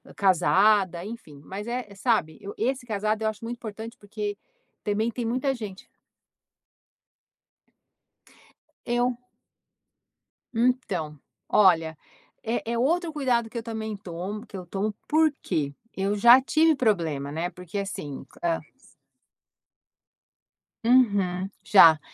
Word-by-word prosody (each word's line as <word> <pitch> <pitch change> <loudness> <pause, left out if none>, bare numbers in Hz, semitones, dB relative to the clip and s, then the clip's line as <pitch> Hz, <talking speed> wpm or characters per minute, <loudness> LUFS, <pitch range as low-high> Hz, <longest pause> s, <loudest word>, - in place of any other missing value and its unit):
casada, 190 -1 +3
enfim, 195 -10 -9
mas 195 +6 -6
é 235 -4 -4
sabe, 195 -8 0
eu 200 - -8
esse 250 +2 -1
casado 215 0 -1
eu - - +2
acho 215 0 -8
muito 235 +1 -4
importante, 225 +1 -8
porque 205 -1 -5 0.5
também 215 +3 0
tem 240 0 -4
muita 260 +4 0
gente 205 -5 -8 2.9
Eu 240 0 0 1.4
Então, 200 - 0 0.3
olha, 165 -6 +4 0.5
é 230 0 -2
é 235 - -1
outro 330 +6 +1
cuidado 250 -6 0
que 235 - -7
eu 230 - -3
também 220 -2 -4
tomo 190 +3 -6
que - - -12
eu 180 - -8
tomo 200 +4 -2
por 315 0 +4
que? 140 -2 -2 0.2
Eu 195 +2 0
já 240 +5 +8
tive 315 +3 +3
problema, 165 - 0
né, 165 +4 -2
porque 180 +1 -8
assim 150 -8 -5 0.2
a 170 -1 +1 2.2
Uhum, 200 -7 +3
já. 165 -6 +7
210 Hz, 115 wpm, -26 LUFS, 185-235 Hz, 2.9 s, já